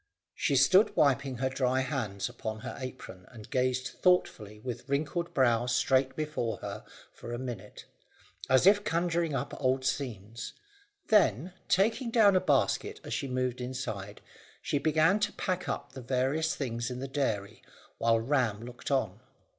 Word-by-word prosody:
She 140 - 0
stood 185 - +5
wiping 135 -2 +2
her 130 +1 0
dry 130 0 +1
hands 115 -8 -2
upon 110 -3 -6
her - - -6
apron, 95 -8 -8
and 110 -4 -12
gazed 130 0 +1
thoughtfully 110 - +1
with 125 +3 -6
wrinkled 155 +5 -1
brow 120 -3 +3
straight 130 +2 +2
before 150 -7 -2
her - - -7 0.3
for 120 - -9
a 120 - -3
minute, 120 -6 -7 0.6
as 130 +5 +5
if 205 +1 +6
conjuring 170 -3 0
up - - -3
old 130 0 +1
scenes; 115 -5 -4 0.6
then, 180 - +3
taking 225 +6 +2
down 215 -4 +5
a - - +6
basket - - +1
as - - -5
she 140 - -2
moved 125 -1 -2
inside, 115 -6 -5 0.4
she 145 - -1
began 160 +6 +3
to 210 - 0
pack 185 -1 -2
up - - -4
the 130 - -8
various 135 +6 0
things 120 -3 -3
in 125 - -5
the 135 +2 -4
dairy, 115 -8 -2 0.4
while 115 0 +3
Ram 115 -3 0
looked 125 0 -8
on. 110 -8 0
130 Hz, 155 wpm, -30 LUFS, 120-155 Hz, 0.6 s, if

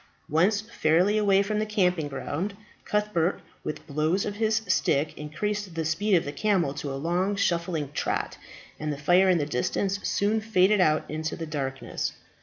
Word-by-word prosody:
Once 185 +7 +3
fairly 190 -2 +2
away 200 -2 +4
from 210 +1 -1
the 215 - 0
camping 180 -7 +1
ground, 170 +7 -4 0.3
Cuthbert, 210 -4 0 0.2
with 155 - -5
blows 155 +6 0
of 205 -1 -4
his 220 0 +1
stick, 145 -4 +1
increased 185 +5 -3
the 165 -1 -1
speed 185 +6 +2
of 170 - +2
the 145 - -3
camel 185 -5 +1
to 145 -1 -5
a - - -3
long 175 +7 0
shuffling 170 -6 -1
trot, - - -2 0.4
and 150 0 -2
the 145 - -4
fire 180 +6 +4
in 180 - +4
the 150 - 0
distance 190 +9 -1
soon 215 +2 +1
faded 210 -2 +3
out 155 -3 +3
into 155 +1 -3
the 165 - -5
darkness. 135 -4 -3
180 Hz, 175 wpm, -27 LUFS, 155-205 Hz, 0.4 s, away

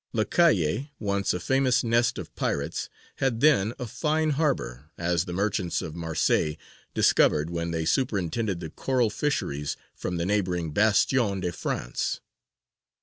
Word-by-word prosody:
Lacalle, 115 - +2
once 100 -2 0
a 90 - -2
famous 130 +5 +2
nest 120 0 +2
of - - -7
pirates, - - -2 0.3
had 130 -4 0
then 125 -8 +4
a 125 - -4
fine 155 +6 0
harbour, 135 - -1
as 85 0 0
the 90 - -6
merchants 95 -1 0
of 80 - -5
Marseilles 80 -2 0 0.4
discovered 75 +2 +3
when 85 0 -2
they 80 -1 -2
superintended 100 -4 0
the 80 -2 -6
coral 125 -5 0
fisheries 75 - -2 0.2
from 90 - -4
the 85 - -1
neighbouring 90 -5 0
Bastion 105 - +3
de 90 -1 -1
France. - - -3
100 Hz, 140 wpm, -26 LUFS, 85-125 Hz, 0.4 s, then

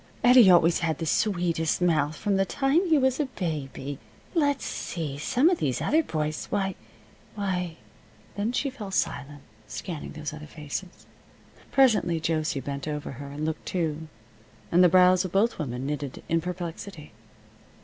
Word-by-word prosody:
Eddie 245 -4 +8
always 175 -1 +5
had 160 -3 -1
the 165 - -3
sweetest 170 -3 +1
mouth, 155 -4 +2
from 200 +4 0
the 195 - +3
time 270 - +1
he 320 -2 +4
was 265 0 +2
a 300 - +2
baby. 145 - -4 0.3
Let's 285 -5 +1
see 150 -5 -4
some 255 - +2
of 355 -1 +3
these 130 -3 0
other 315 +2 +3
boys. 155 - -3
Why 195 -1 0 0.6
why 180 -5 -2 0.3
" 110 -1 -28
Then 205 +3 -1
she 275 +2 -1
fell 215 -6 -7
silent, 145 -6 -2 0.2
scanning 170 -5 -6
those 155 -1 -5
other 150 0 -9
faces. 155 +5 -7 0.7
Presently 220 -11 +4
Josie 155 -3 -1
bent 140 +2 -5
over 150 -1 -4
her 140 +2 -8
and 145 +2 -4
looked 160 0 -4
too, 160 -3 -2 0.6
and 175 +2 +6
the 180 - +7
brows 185 +1 +5
of 185 - -5
both 205 +4 +2
women 125 -4 -3
knitted 145 -2 -4
in 165 0 +1
perplexity. 175 -1 -6
170 Hz, 160 wpm, -26 LUFS, 150-200 Hz, 0.7 s, Eddie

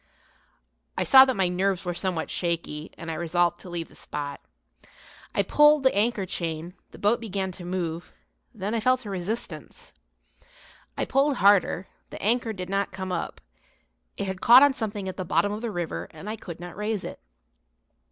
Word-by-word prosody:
I - - +2
saw 265 0 +9
that 260 -1 0
my 190 -3 +2
nerves 185 +1 0
were 175 - -1
somewhat 175 -2 -2
shaky, 165 -3 -2
and 165 -1 -6
I - - -3
resolved 175 +1 +1
to 185 - -10
leave 170 -1 -4
the - - -20
spot. 145 -1 -5 0.9
I - - +3
pulled 295 -1 +5
the 260 - +4
anchor 210 -1 +1
chain, 170 -1 -4 0.2
the - - -13
boat 210 +4 +2
began 195 -4 -3
to 180 - -11
move; 175 -2 -3 0.4
then 210 -2 -4
I 230 - +1
felt 255 +2 +2
a 205 - -5
resistance. 195 +5 -4 1.0
I - - 0
pulled 275 +2 +2
harder, 195 -3 +3 0.2
the - - -8
anchor 230 +2 +1
did 185 -4 -6
not 195 +1 -1
come 190 0 -5
up; 180 - -4 0.8
it - - -2
had 190 -1 -4
caught 245 +4 +9
on 285 -1 +5
something 210 -5 -4
at 185 - -5
the 185 - -2
bottom 170 +3 +1
of 210 +1 -4
the 235 - -2
river 165 - -4
and 200 - -11
I 215 - -3
could 175 -6 -9
not 175 0 -8
raise 210 0 -2
it. - - -7
190 Hz, 185 wpm, -26 LUFS, 175-220 Hz, 1.0 s, saw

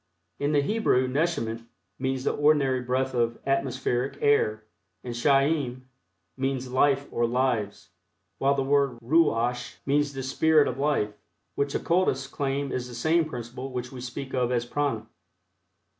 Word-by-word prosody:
In 145 +1 0
the 145 -2 +3
Hebrew 145 - +2
neshemet 130 -5 -1 0.4
means 130 0 -1
the - - +1
ordinary 145 -3 +3
breath 130 +2 -1
of 120 -1 0
atmospheric 130 -1 -1
air, 110 -7 +2 0.4
and 120 - -5
chayim 135 0 +1 0.5
means 130 -1 -2
life 140 +1 +2
or 120 0 +1
lives, 120 -4 -1 0.5
while 140 +1 +3
the 135 - 0
word 140 -2 +2
ruach 125 -3 +1
means 145 +1 +1
the 135 -1 -5
"spirit 150 +3 +3
of 125 - -3
life," 140 -8 +1 0.4
which 140 0 -1
occultists 170 -7 +1
claim 140 0 -2
is 125 -1 -3
the 120 - -9
same 160 +7 +2
principle 125 -1 -6
which 125 0 -4
we 130 -2 -8
speak 130 +2 -6
of 125 -1 +1
as 120 -1 0
Prana. 140 -3 -1
130 Hz, 145 wpm, -26 LUFS, 125-145 Hz, 0.5 s, the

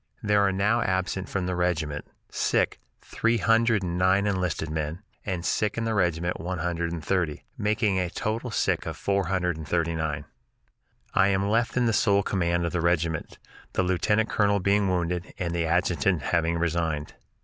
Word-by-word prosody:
There 105 -1 +3
are 100 -1 +3
now 105 +5 +2
absent 95 0 -1
from 95 -2 -2
the 90 0 -1
regiment, 80 -5 -1 0.3
sick, - - +1 0.2
three 115 +1 0
hundred 115 0 +3
and 90 0 -2
nine 95 +2 +3
enlisted 90 -6 -1
men, 80 +4 -3 0.2
and 90 -3 -2
sick 105 0 0
in 115 - 0
the 115 - 0
regiment 85 -3 0
one 90 +2 -3
hundred 85 0 -2
and 80 -3 -5
thirty, 85 -6 -1
making 105 -2 +1
a 90 -1 -1
total 115 +6 -3
sick 110 - 0
of - - -4
four 100 -2 0
hundred 90 -2 0
and 80 -2 -8
thirty 85 0 0
nine. 75 -2 -2 0.9
I - - +4
am 100 0 +1
left 115 +3 +1
in 120 -2 +3
sole 100 -2 +3
command 85 -3 0
of 85 - -1
the 90 - 0
regiment, 85 -2 0 0.4
the - - +1
lieutenant 105 +5 +1
colonel 100 -1 +2
being 100 +1 +2
wounded 90 -1 -2
and 85 -2 -2
the 85 -1 0
adjutant 90 -1 +1
having 85 -1 +1
resigned. 80 -3 -1
90 Hz, 180 wpm, -26 LUFS, 85-100 Hz, 0.9 s, I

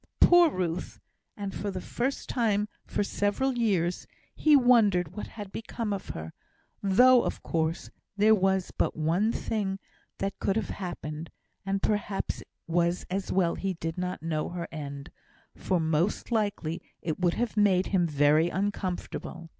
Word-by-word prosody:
Poor 350 -1 +7
Ruth! 180 - -3 0.4
and, 200 -2 -4
for 205 - -3
the 190 -2 -4
first 250 +8 -3
time 210 -4 +1 0.2
for - - 0
several 205 +7 0
years, 190 -7 0 0.3
he 305 -1 +4
wondered 210 - +4
what 210 - -5
had 205 -3 -9
become 225 -1 -4
of 195 -2 -5
her; 80 0 -6 0.5
though, 245 +6 +6
of - - -4
course, 160 0 -1 0.3
there 215 +2 +6
was 190 -2 +1
but - - -1
one 170 +8 +1
thing 200 -5 -2 0.4
that 195 0 -3
could 195 - 0
have 220 - -1
happened, 165 -4 -5 0.4
and 195 0 -1
perhaps 205 -2 -1
it - - -14 0.2
was 170 +1 +1
as 195 +1 -2
well 175 -3 +2
he 195 -1 -2
did 165 0 -4
not 180 -2 -4
know 155 -2 -1
her 175 -1 -5
end, 140 -3 -7 0.4
for 185 - 0
most 160 +8 0
likely 200 -7 -1 0.2
it 160 0 -2
would 175 -2 +2
have 235 -2 -1
made 195 -3 +4
him 175 -3 +3
very 150 +2 +3
uncomfortable. 185 -3 -3
190 Hz, 155 wpm, -28 LUFS, 170-210 Hz, 0.5 s, Poor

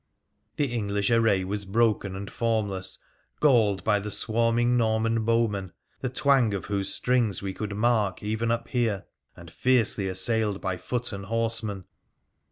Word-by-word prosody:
The 145 -5 -1
English 100 -2 -1
array 115 -5 +3
was 100 +2 -3
broken 100 -1 +1
and 100 +1 -6
formless, 105 -5 -1 0.4
galled 110 -10 +3
by 105 -2 +2
the 105 +1 -5
swarming 115 +3 +2
Norman 115 -1 +1
bowmen, 110 -5 0 0.3
the 130 - -2
twang 135 -5 +2
of 95 - -5
whose 100 -1 -1
strings 120 -7 0
we 95 -1 -3
could 105 +1 -5
mark 105 -4 +1
even 110 +2 -1
up 115 0 -1
here, 115 -6 0 0.3
and 85 -1 -12
fiercely 115 -6 +2
assailed 100 +2 0
by 95 -2 -3
foot 120 +3 -2
and 100 -1 -6
horsemen. 110 -4 -1
110 Hz, 150 wpm, -26 LUFS, 100-115 Hz, 0.4 s, array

